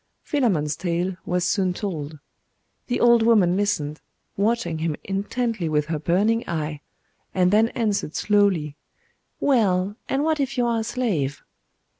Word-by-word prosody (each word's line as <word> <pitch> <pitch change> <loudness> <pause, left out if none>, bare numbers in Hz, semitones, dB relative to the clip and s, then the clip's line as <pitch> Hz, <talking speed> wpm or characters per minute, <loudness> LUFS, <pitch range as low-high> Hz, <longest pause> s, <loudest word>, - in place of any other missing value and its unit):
Philammon's 185 - 0
tale 175 +1 -2
was 180 0 0
soon 185 -1 +1
told. 160 -8 -4 0.7
The 245 - -1
old 235 -1 +5
woman 210 -6 +4
listened, 175 -7 -1 0.3
watching 200 -6 0
him 160 -1 -1
intently 200 -1 -2
with 150 -1 +1
her 160 -1 -3
burning 205 +9 +1
eye; 150 -3 -3 0.5
and 180 -1 +3
then 215 +2 +5
answered 205 -8 -1
slowly 195 -8 +2 0.6
'Well, 205 -7 +2
and 270 +2 +1
what 315 -1 +1
if 270 -1 -2
you 245 - +2
are 235 -1 +1
a - - -2
slave? 210 - -2
195 Hz, 140 wpm, -23 LUFS, 165-230 Hz, 0.7 s, old